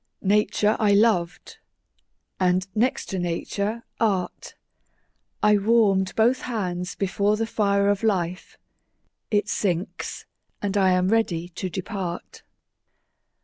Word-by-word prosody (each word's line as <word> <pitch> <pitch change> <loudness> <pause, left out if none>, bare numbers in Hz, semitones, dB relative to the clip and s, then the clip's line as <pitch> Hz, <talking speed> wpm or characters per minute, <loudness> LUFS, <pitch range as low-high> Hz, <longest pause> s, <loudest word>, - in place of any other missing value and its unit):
Nature 210 +1 +2
I 210 -2 +3
loved 200 -5 +1 0.8
and, 185 +1 +2
next 235 +4 0
to 190 - -2
Nature, 200 +6 -2 0.2
Art: 195 -6 -1 0.9
I 210 0 +5
warm'd 200 -3 +2
both 240 +4 +3
hands 180 -7 -3
before 200 +2 0
the 225 - 0
fire 200 -3 +1
of 205 -1 +1
life; 185 -5 -1 0.7
It 210 -1 +1
sinks, 180 0 -3 0.3
and 205 -1 -2
I 195 -2 +4
am 185 0 +2
ready 175 -6 0
to 185 +2 -5
depart. 180 0 -5
200 Hz, 110 wpm, -24 LUFS, 180-215 Hz, 0.9 s, I